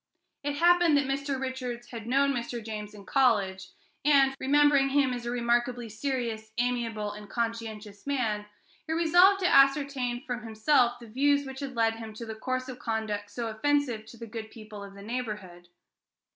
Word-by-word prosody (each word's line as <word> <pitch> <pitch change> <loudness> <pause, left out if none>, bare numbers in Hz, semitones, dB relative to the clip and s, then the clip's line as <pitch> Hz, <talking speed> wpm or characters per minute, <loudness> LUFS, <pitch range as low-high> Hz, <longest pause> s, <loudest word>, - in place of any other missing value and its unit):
It 290 0 -2
happened 345 -1 +5
that 285 - +2
Mr. 275 0 -2
Richards 255 -2 -5
had 230 -2 -7
known 275 +2 +3
Mr. 235 -2 -4
James 210 -1 -6
in 200 -1 -12
college, 200 -7 +2 0.4
and, 275 -2 +5
remembering 285 0 +4
him 270 -2 +2
as 240 -1 -5
a - - -1
remarkably 240 0 0
serious, 225 -2 -3
amiable, 235 -4 -1
and 210 0 -10
conscientious 225 -2 -4
man, 220 -7 -1 0.4
he 320 - -1
resolved 350 +4 +5
to 360 - +3
ascertain 275 -4 +3
from 245 -4 -3
himself 235 +3 +2
the 235 - -11
views 285 +5 +2
which 265 0 -7
had 275 -3 -5
led 225 -1 +2
him 220 -1 -8
to 230 - -7
the 220 - -5
course 255 +3 -3
of 255 -1 -8
conduct 215 -3 -3
so 235 +3 -4
offensive 230 0 0
to 235 - -12
the 230 - -7
good 220 -1 -7
people 215 -2 -10
of 200 0 -11
the 200 - -11
neighborhood. 210 -7 -5
240 Hz, 175 wpm, -28 LUFS, 220-275 Hz, 0.4 s, happened